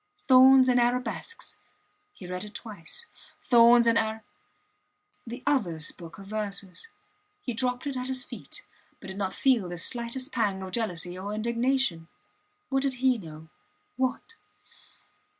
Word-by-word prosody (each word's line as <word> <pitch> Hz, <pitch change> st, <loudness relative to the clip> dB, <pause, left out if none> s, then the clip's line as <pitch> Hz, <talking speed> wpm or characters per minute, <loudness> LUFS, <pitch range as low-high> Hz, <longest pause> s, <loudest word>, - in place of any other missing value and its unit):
Thorns 260 Hz, 0 st, +8 dB
and 250 Hz, -1 st, +4 dB
Arabesques. 245 Hz, -, -2 dB, 0.5 s
He 185 Hz, -, -12 dB
read 180 Hz, +1 st, -4 dB
it 210 Hz, 0 st, -10 dB
twice, 210 Hz, -, -3 dB, 0.4 s
Thorns 235 Hz, -1 st, +6 dB
and 230 Hz, 0 st, +4 dB
Ar........ 220 Hz, 0 st, -2 dB, 1.0 s
The 240 Hz, +2 st, -7 dB
others 175 Hz, -, 0 dB
book 165 Hz, -2 st, -12 dB
of 195 Hz, -, -11 dB
verses. 200 Hz, -, -5 dB, 0.6 s
He 245 Hz, -, -3 dB
dropped 250 Hz, +2 st, -1 dB
it 280 Hz, -2 st, -3 dB
at 255 Hz, 0 st, -3 dB
his 260 Hz, -1 st, 0 dB
feet, -, -, -7 dB, 0.3 s
but -, -, -10 dB
did 190 Hz, -, -7 dB
not 190 Hz, -2 st, -1 dB
feel 240 Hz, -9 st, +2 dB
the 175 Hz, -, -5 dB
slightest 240 Hz, -, -2 dB
pang 200 Hz, -5 st, 0 dB
of 190 Hz, -, -7 dB
jealousy 180 Hz, -5 st, -2 dB
or 200 Hz, +2 st, -4 dB
indignation. 235 Hz, -6 st, 0 dB, 0.6 s
What 270 Hz, 0 st, +1 dB
did 270 Hz, -1 st, 0 dB
he 255 Hz, -1 st, +2 dB
know?... 160 Hz, -3 st, -11 dB, 0.5 s
What? 260 Hz, -, -2 dB
230 Hz, 145 wpm, -27 LUFS, 190-255 Hz, 1.0 s, Thorns